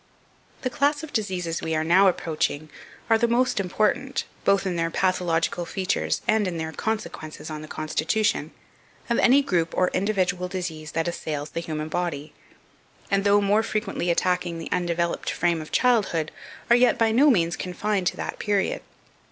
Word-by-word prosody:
The 255 Hz, -, -1 dB
class 290 Hz, +4 st, +1 dB
of 315 Hz, -, -8 dB
diseases 180 Hz, -6 st, -2 dB
we 160 Hz, 0 st, -1 dB
are 155 Hz, -, +1 dB
now 185 Hz, +5 st, +5 dB
approaching 155 Hz, -3 st, -1 dB, 0.4 s
are 225 Hz, -1 st, +4 dB
the 235 Hz, -, +3 dB
most 240 Hz, -1 st, +2 dB
important, 215 Hz, +8 st, 0 dB, 0.2 s
both 195 Hz, 0 st, +3 dB
in 185 Hz, -2 st, -1 dB
their 165 Hz, -1 st, 0 dB
pathological 175 Hz, -1 st, 0 dB
features 185 Hz, +2 st, -1 dB
and 215 Hz, -3 st, +3 dB
in 175 Hz, -2 st, -3 dB
their 160 Hz, 0 st, -3 dB
consequences 160 Hz, -6 st, -4 dB
on 155 Hz, 0 st, -5 dB
the 155 Hz, -, -9 dB
constitution, 160 Hz, +9 st, 0 dB, 0.6 s
of 235 Hz, -, +2 dB
any 275 Hz, +3 st, +5 dB
group 170 Hz, -8 st, 0 dB
or 185 Hz, -, +3 dB
individual 185 Hz, -2 st, 0 dB
disease 175 Hz, -5 st, -5 dB
that 165 Hz, 0 st, 0 dB
assails 150 Hz, -3 st, -4 dB
the -, -, -3 dB
human 155 Hz, -2 st, -4 dB
body; 155 Hz, -3 st, -3 dB, 0.8 s
and 195 Hz, 0 st, +2 dB
though 205 Hz, 0 st, +4 dB
more 205 Hz, +2 st, +3 dB
frequently 215 Hz, -5 st, -2 dB
attacking 180 Hz, 0 st, 0 dB
the 165 Hz, -, -7 dB
undeveloped 170 Hz, -1 st, -1 dB
frame 170 Hz, -2 st, 0 dB
of 155 Hz, -, -10 dB
childhood, 205 Hz, -11 st, +2 dB, 0.4 s
are -, -, +9 dB
yet 245 Hz, +1 st, +4 dB
by 225 Hz, -1 st, +3 dB
no 275 Hz, +7 st, +5 dB
means 170 Hz, -8 st, +2 dB
confined 190 Hz, +1 st, -2 dB
to -, -, -1 dB
that -, -, -5 dB
period. 205 Hz, -2 st, 0 dB
180 Hz, 170 wpm, -25 LUFS, 165-215 Hz, 0.8 s, are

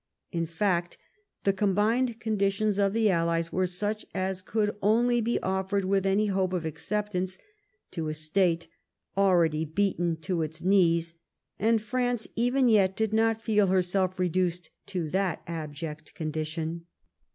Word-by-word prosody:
In 165 Hz, -1 st, -1 dB
fact, 175 Hz, 0 st, -1 dB, 0.5 s
the 195 Hz, -, +3 dB
com 195 Hz, -1 st, +1 dB
bined 230 Hz, +3 st, +1 dB
conditions 205 Hz, -1 st, 0 dB
of 200 Hz, -1 st, +3 dB
the 220 Hz, -1 st, +3 dB
allies 165 Hz, -1 st, 0 dB
were 185 Hz, 0 st, +1 dB
such 205 Hz, +4 st, -3 dB
as 190 Hz, 0 st, -1 dB
could 210 Hz, +2 st, -1 dB
only 235 Hz, +4 st, +3 dB
be 235 Hz, +2 st, 0 dB
offered 190 Hz, +1 st, 0 dB
with 195 Hz, 0 st, +1 dB
any 200 Hz, +2 st, +3 dB
hope 190 Hz, -2 st, 0 dB
of 175 Hz, -3 st, -2 dB
acceptance 190 Hz, +2 st, -2 dB, 0.5 s
to 165 Hz, -3 st, -3 dB
a -, -, -2 dB
state 165 Hz, +2 st, +1 dB, 0.5 s
al 195 Hz, -1 st, +4 dB
ready 160 Hz, -2 st, +2 dB
beaten 175 Hz, 0 st, 0 dB
to 175 Hz, 0 st, -1 dB
its 160 Hz, +2 st, -4 dB
knees, 170 Hz, -3 st, +3 dB, 0.5 s
and 225 Hz, +1 st, +2 dB
France 245 Hz, 0 st, -1 dB
even 245 Hz, +3 st, +2 dB
yet 195 Hz, -4 st, +4 dB
did 220 Hz, -1 st, 0 dB
not 225 Hz, 0 st, +2 dB
feel 210 Hz, -3 st, +3 dB
herself 185 Hz, 0 st, +1 dB
reduced 180 Hz, -1 st, -1 dB, 0.2 s
to 180 Hz, -5 st, -2 dB
that 190 Hz, -2 st, 0 dB
abject 155 Hz, -1 st, -6 dB
condition. 160 Hz, +2 st, -4 dB
190 Hz, 150 wpm, -28 LUFS, 170-210 Hz, 0.5 s, al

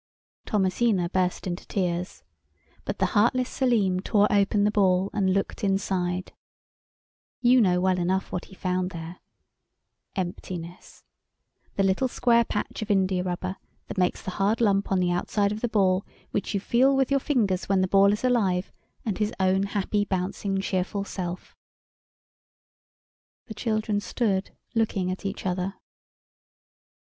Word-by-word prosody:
Thomasina 190 Hz, -2 st, +1 dB
burst 185 Hz, 0 st, 0 dB
into 180 Hz, -1 st, -5 dB
tears—but 180 Hz, -2 st, -5 dB
the -, -, +2 dB
heartless 245 Hz, +4 st, +3 dB
Selim 215 Hz, -8 st, +2 dB
tore 205 Hz, +2 st, +3 dB
open 205 Hz, 0 st, +3 dB
the 210 Hz, -, +3 dB
Ball, 190 Hz, -2 st, +2 dB
and 195 Hz, -3 st, +1 dB
looked 195 Hz, +2 st, -1 dB
inside. 185 Hz, -2 st, -1 dB, 1.1 s
You 250 Hz, 0 st, +5 dB
know 180 Hz, -4 st, +3 dB
well 185 Hz, 0 st, +2 dB
enough 185 Hz, +2 st, 0 dB
what 180 Hz, -, -3 dB
he 190 Hz, -, -15 dB
found 185 Hz, -1 st, -1 dB
there. 170 Hz, 0 st, -8 dB, 1.0 s
Emptiness; 175 Hz, -1 st, -6 dB, 0.7 s
the 195 Hz, -, +2 dB
little 195 Hz, +7 st, +2 dB
square 235 Hz, -1 st, +3 dB
patch 210 Hz, -1 st, -4 dB
of 215 Hz, -, -5 dB
india 190 Hz, -2 st, +2 dB
rubber 185 Hz, +1 st, -3 dB, 0.3 s
that -, -, -3 dB
makes 180 Hz, -, +1 dB
the 185 Hz, -, -4 dB
hard 200 Hz, +4 st, +1 dB
lump 200 Hz, -4 st, +2 dB
on 190 Hz, -, +3 dB
the 180 Hz, -1 st, +1 dB
outside 200 Hz, +3 st, 0 dB
of 210 Hz, +1 st, -4 dB
the 240 Hz, -, 0 dB
ball 190 Hz, -3 st, +2 dB, 0.3 s
which 205 Hz, -, -2 dB
you -, -, +2 dB
feel 255 Hz, +7 st, +3 dB
with 270 Hz, 0 st, +1 dB
your 275 Hz, -, +4 dB
fingers 215 Hz, -, 0 dB
when 195 Hz, -1 st, +3 dB
the 185 Hz, -, +2 dB
ball 195 Hz, +1 st, +5 dB
is 210 Hz, -, -2 dB
alive 200 Hz, -8 st, +1 dB, 0.3 s
and 210 Hz, -4 st, -2 dB
his 210 Hz, 0 st, +1 dB
own 190 Hz, 0 st, +3 dB
happy, 205 Hz, +1 st, 0 dB
bouncing, 195 Hz, 0 st, -2 dB
cheerful 195 Hz, +1 st, -1 dB
self. 180 Hz, -2 st, -6 dB, 1.9 s
The 220 Hz, -, -8 dB
children 215 Hz, -1 st, -1 dB
stood 205 Hz, -2 st, -1 dB, 0.2 s
looking 205 Hz, -5 st, 0 dB
at 190 Hz, +2 st, -4 dB
each 195 Hz, -, -6 dB
other. 185 Hz, +1 st, -1 dB
195 Hz, 145 wpm, -26 LUFS, 185-210 Hz, 1.9 s, You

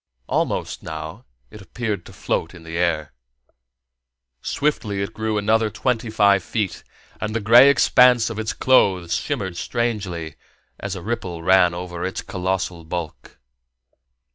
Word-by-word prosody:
Almost, -, -, -1 dB
now, -, -, -7 dB, 0.3 s
it 105 Hz, -, -11 dB
appeared 105 Hz, -3 st, -4 dB
to -, -, -12 dB
float 80 Hz, -, -3 dB
in 85 Hz, -, -13 dB
the 80 Hz, 0 st, -7 dB
air. 85 Hz, -3 st, 0 dB, 1.3 s
Swiftly 110 Hz, -9 st, -1 dB
it 100 Hz, +3 st, -6 dB
grew 110 Hz, 0 st, -2 dB
another 110 Hz, +1 st, +2 dB
twenty 115 Hz, +2 st, -1 dB
five 100 Hz, -2 st, +4 dB
feet, 105 Hz, +1 st, -3 dB, 0.4 s
and 110 Hz, 0 st, -3 dB
the -, -, +1 dB
gray 120 Hz, +6 st, +7 dB
expanse 125 Hz, -4 st, +5 dB
of 110 Hz, -, -5 dB
its 110 Hz, 0 st, -2 dB
clothes 95 Hz, -9 st, +3 dB
shimmered 95 Hz, -3 st, -2 dB
strangely 95 Hz, -11 st, -3 dB, 0.4 s
as 100 Hz, -1 st, -4 dB
a 90 Hz, -, -7 dB
ripple 95 Hz, -7 st, -4 dB
ran 90 Hz, -1 st, +4 dB
over 90 Hz, -1 st, -6 dB
its 95 Hz, +4 st, -3 dB
colossal 95 Hz, -3 st, -3 dB
bulk. 80 Hz, -1 st, -6 dB
100 Hz, 140 wpm, -22 LUFS, 90-110 Hz, 1.3 s, gray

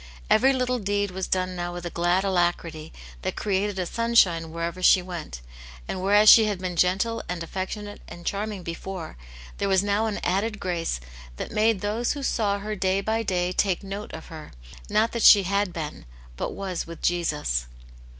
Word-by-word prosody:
Every 260 Hz, +5 st, +5 dB
little 250 Hz, -1 st, 0 dB
deed 205 Hz, -1 st, -1 dB
was 190 Hz, 0 st, -4 dB
done 185 Hz, 0 st, -1 dB
now 175 Hz, 0 st, -3 dB
with 175 Hz, 0 st, -7 dB
a 175 Hz, -, -4 dB
glad 175 Hz, +3 st, +1 dB
alacrity 175 Hz, -4 st, -1 dB, 0.3 s
that -, -, -3 dB
created 200 Hz, 0 st, -1 dB
a 185 Hz, -, -1 dB
sunshine 185 Hz, -7 st, +2 dB
wherever 170 Hz, +2 st, -4 dB
she 185 Hz, -, +6 dB
went, 175 Hz, -, -7 dB, 0.5 s
and 185 Hz, -, -4 dB
whereas 205 Hz, +3 st, +4 dB
she 220 Hz, +1 st, +10 dB
had 205 Hz, -2 st, -1 dB
been 180 Hz, -1 st, -4 dB
gentle 190 Hz, +7 st, +1 dB
and 175 Hz, -1 st, -3 dB
affectionate 205 Hz, +4 st, -5 dB
and 175 Hz, 0 st, -11 dB
charming 205 Hz, -1 st, -3 dB
before, 170 Hz, 0 st, -6 dB, 0.4 s
there 200 Hz, -, 0 dB
was 190 Hz, 0 st, +3 dB
now 205 Hz, +2 st, +1 dB
an 210 Hz, -, -3 dB
added 205 Hz, +4 st, 0 dB
grace 170 Hz, -, -2 dB, 0.4 s
that -, -, -5 dB
made 215 Hz, -2 st, +2 dB
those 220 Hz, +4 st, 0 dB
who 285 Hz, -1 st, -6 dB
saw 205 Hz, -6 st, +1 dB
her 210 Hz, +1 st, -4 dB
day 190 Hz, 0 st, +1 dB
by 220 Hz, +2 st, 0 dB
day 180 Hz, -4 st, 0 dB
take 185 Hz, 0 st, 0 dB
note 200 Hz, +2 st, -6 dB
of -, -, -9 dB
her, 155 Hz, -2 st, -10 dB, 0.4 s
not 215 Hz, +2 st, +2 dB
that 235 Hz, -, -3 dB
she 205 Hz, -1 st, +8 dB
had 200 Hz, +1 st, 0 dB
been, 155 Hz, -, -6 dB, 0.3 s
but -, -, -3 dB
was 190 Hz, -4 st, -4 dB
with 170 Hz, 0 st, -10 dB
Jesus. 150 Hz, -, 0 dB
190 Hz, 185 wpm, -25 LUFS, 175-210 Hz, 0.5 s, she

